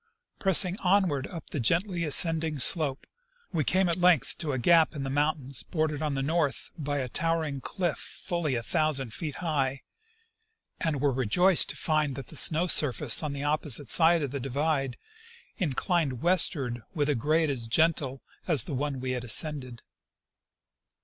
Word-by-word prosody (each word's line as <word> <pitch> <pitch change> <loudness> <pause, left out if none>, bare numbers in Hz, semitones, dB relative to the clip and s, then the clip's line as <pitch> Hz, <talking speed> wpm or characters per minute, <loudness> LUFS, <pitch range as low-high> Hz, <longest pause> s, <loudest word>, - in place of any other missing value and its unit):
Pressing 190 0 +3
onward 180 -8 +1
up 170 -3 -10
the 150 - -3
gently 170 - 0
ascending 160 0 +2
slope, 140 -1 +3 0.5
we 160 -3 0
came 185 +5 +1
at 170 - +1
length 180 -6 +2
to 155 -3 -3
a 130 - -2
gap 160 +6 +3
in 140 - -5
the 135 - -4
mountains 140 -4 -2
bordered 155 +3 -3
on 150 -2 -2
the 135 - -2
north 155 -1 -2
by 145 -2 -4
a 130 -2 -3
towering 160 -1 -1
cliff 175 -2 -3
fully 170 -6 -4
a 115 - -3
thousand 140 -4 -1
feet 150 -5 -6
high, 140 -4 -2 1.0
and 155 -5 -1
were 145 -1 +2
rejoiced 145 - +3
to - - -3
find 155 -4 -1
that 135 - -9
the - - -11
snow 160 +2 +3
surface 145 -8 +4
on 150 -2 -4
the 140 0 -6
opposite 145 -3 0
side 165 -1 +4
of 140 - -4
the 140 - -4
divide 135 0 -2 0.6
inclined 155 - -1
westward 145 -9 +1
with 145 -3 0
a 150 - +1
grade 155 +5 0
as 120 -4 -5
gentle 140 -1 0 0.2
as 155 - +4
the - - -7
one 140 0 -3
we 130 0 -4
had 125 -1 -4
ascended. 125 -1 0
150 Hz, 170 wpm, -27 LUFS, 135-165 Hz, 1.0 s, surface